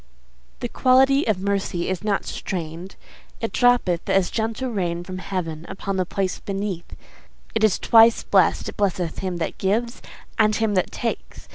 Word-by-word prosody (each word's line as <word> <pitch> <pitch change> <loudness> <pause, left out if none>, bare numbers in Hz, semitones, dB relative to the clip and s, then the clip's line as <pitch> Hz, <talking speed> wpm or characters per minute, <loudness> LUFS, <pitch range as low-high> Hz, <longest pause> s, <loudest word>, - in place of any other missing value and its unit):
The - - -1
quality 265 +3 +3
of 215 -4 +2
mercy 195 -3 -1
is 185 +1 -2
not 205 -2 0
strain'd; 170 +1 -5 0.4
It 225 - -3
droppeth 245 -9 +2
as 190 -2 +2
the - - -19
gentle 230 +3 -2
rain 175 -5 -2
from 185 +1 -7
heaven 165 -5 -4
Upon 195 0 -4
the 185 -2 0
place 190 -1 -2
beneath. 195 -3 -4 0.6
It 220 - 0
is 215 -5 +4
twice 225 0 +5
blest: 190 -4 +2
It - - -7
blesseth 185 -4 -1
him 185 -2 -3
that 165 - -4
gives 230 +5 -1 0.4
and 215 -1 +4
him 220 -1 0
that 185 -2 0
takes. 235 - -5
195 Hz, 165 wpm, -23 LUFS, 180-225 Hz, 0.6 s, twice